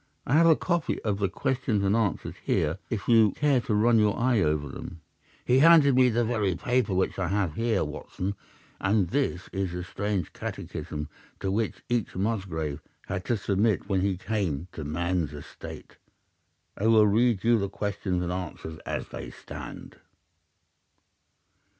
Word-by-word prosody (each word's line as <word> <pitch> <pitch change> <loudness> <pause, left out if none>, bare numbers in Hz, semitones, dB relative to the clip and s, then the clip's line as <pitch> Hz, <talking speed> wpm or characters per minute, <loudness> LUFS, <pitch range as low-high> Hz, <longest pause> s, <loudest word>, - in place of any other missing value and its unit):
I 125 - -1
have 165 +2 +6
a 160 - +7
copy 170 0 -1
of 105 -2 -1
the 100 -2 +1
questions 120 -1 -1
and 100 +2 +2
answers 110 -6 -1
here 80 +5 0
if 110 -4 -3
you 110 -4 +5
care 145 -4 +2
to 110 - -1
run 115 +2 +4
your 105 0 +2
eye 120 -3 +2
over 75 -3 +1
them.' 80 +4 -8 0.4
"He 125 +1 +4
handed 155 -2 +7
me 125 0 +5
the 120 0 +1
very 105 -6 0
paper 120 -1 0
which 95 +1 0
I 95 - 0
have 95 -3 0
here, 115 +1 +1
Watson, 80 +6 -4 0.5
and 95 -2 +2
this 130 -8 -1
is 95 -2 -2
the 90 0 -4
strange 100 -1 -3
catechism 75 0 -5 0.3
to 95 - -2
which 110 +2 -2
each 120 -3 -1
Musgrave 95 -8 -2 0.2
had 95 -1 -4
to 120 - +1
submit 100 +1 +1
when 95 -2 +2
he 95 -1 0
came 90 -7 -2
to 80 - -6
man's 85 +1 -1
estate. 75 - -10 0.8
I 105 - 0
will 110 -1 +6
read 110 0 +3
you 115 0 +4
the 100 -1 -2
questions 100 -3 -2
and 90 - -2
answers 85 -3 -5
as - - -3
they - - -7
stand. - - -9
100 Hz, 165 wpm, -27 LUFS, 90-115 Hz, 0.8 s, a